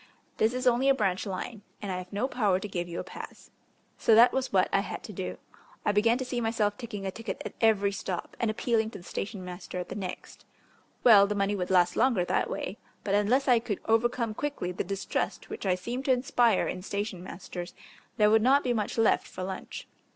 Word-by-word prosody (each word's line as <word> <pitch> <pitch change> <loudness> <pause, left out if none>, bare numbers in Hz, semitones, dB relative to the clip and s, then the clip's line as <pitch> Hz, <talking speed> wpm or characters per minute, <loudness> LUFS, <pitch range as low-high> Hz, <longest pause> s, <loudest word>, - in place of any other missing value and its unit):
This 225 +3 +2
is 255 +1 -2
only 250 +2 +4
a 275 - +5
branch 195 -4 0
line, 200 +3 -5 0.2
and 200 -2 -4
I 180 - -2
have 180 0 -10
no 210 +6 0
power 205 -8 +1
to 210 - -5
give 175 -3 -4
you 170 - -4
a - - -3
pass." - - -10 0.5
So 225 - +5
that 235 +2 +7
was 265 -1 -1
what - - +4
I - - +5
had - - -5
to - - -8
do. - - -4 0.5
I - - +4
began 225 +3 +3
to 260 - -3
see 245 -1 -2
myself 220 -2 0
taking 215 -5 -6
a 190 - -1
ticket 225 +1 -6
at - - -5
every 205 -3 +4
stop 190 -2 -5
and 230 - +1
appealing 220 0 +1
to - - -9
the 175 - -13
station 195 +1 -5
master 180 0 -7
at 180 - -4
the - - -5
next. 190 -3 -7 0.6
Well, 205 -4 +8
the 210 - -2
money 200 0 +1
would 180 -2 -3
last 180 -2 +4
longer 235 -8 +3
that - - 0
way, 195 - -4 0.2
but 200 - -1
unless 225 +7 +3
I 245 -2 +6
could 225 -4 -3
overcome 230 0 +1
quickly 280 -8 -3
the 180 - -3
distrust 195 +1 -3
which - - -4
I 185 - +3
seemed 240 +8 -5
to 270 - +3
inspire 245 -4 +3
in 185 - -4
station 200 -1 -4
masters 180 -1 -7 0.4
there 210 -1 +5
would 220 0 +5
not 270 +5 +4
be 245 - +1
much 215 -1 -2
left 225 -1 +3
for 185 - -7
lunch. 190 0 -6
210 Hz, 225 wpm, -28 LUFS, 190-235 Hz, 0.6 s, Well